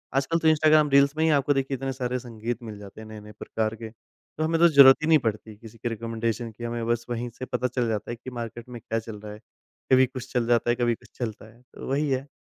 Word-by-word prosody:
आजकल 140 +5 +1
तो 160 - +1
Instagram 155 -1 +4
reels 140 +1 +4
में 160 - +2
ही 160 - +3
आपको 140 +1 +1
देखिए 135 0 -1
इतने 135 +1 -3
सारे 125 -1 -2
संगीत 120 0 -6
मिल 110 -2 -8
जाते 100 +1 -11
हैं 110 - -10
नए-नए 105 -1 -10
प्रकार 110 0 -2
के। 110 0 -8 0.5
तो 155 - -1
हमें 165 +1 +1
तो 170 - +8
ज़रूरत 140 -4 +8
ही - - 0
नहीं 160 -2 +6
पड़ती 110 -2 -4
किसी 115 +1 -14
के 120 +1 -3
रेकमेंडेशन 115 0 -3
की। 120 - -11
हमें 120 -1 -3
बस 120 0 0
वहीं 120 0 -3
से 130 - -4
पता 125 0 -1
चल 125 -1 -1
जाता 110 0 -3
है - - -4
कि 120 +2 -9
मार्केट 120 0 -7
में 120 - -8
क्या 115 +1 -2
चल 110 -2 -9
रहा 105 0 -9
है। 105 - -11 0.5
कभी 130 0 +6
कुछ 130 0 -9
चल 120 -2 0
जाता 120 0 +2
है, 120 - +3
कभी 120 -1 +1
कुछ - - -21
चलता 110 -2 -6
है, 120 - -23
तो - - -9
वही 145 +2 0
है। 135 +1 -1
120 Hz, 265 wpm, -25 LUFS, 115-135 Hz, 0.5 s, तो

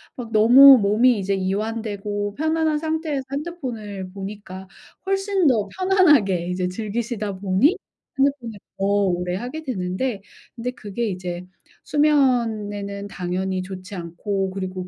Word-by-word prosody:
막 235 -3 -7
너무 255 +5 +9
몸이 215 +3 +3
이제 195 +1 -1
이완되고 205 +1 -3
편안한 315 0 +1
상태에서 315 -3 -2
핸드폰을 240 - -5
보니까 195 -1 -8 0.4
훨씬 390 -2 0
더 215 -6 +2
편안하게 295 - +3
이제 180 0 -1
즐기시다 215 0 -4
보니 200 - +2 0.4
핸드폰을 265 -6 0 0.2
더 195 - -1
오래 180 -3 +1
하게 250 +10 -5
되는데 200 -1 -3 0.3
근데 245 +1 -3
그게 220 0 -4
이제 180 -1 -5 0.4
수면에는 225 -9 +1
당연히 185 +1 -2
좋지 185 +1 -9
않고 190 +3 -3
그리고 185 -1 -5
210 Hz, 290 characters per minute, -22 LUFS, 190-265 Hz, 0.4 s, 너무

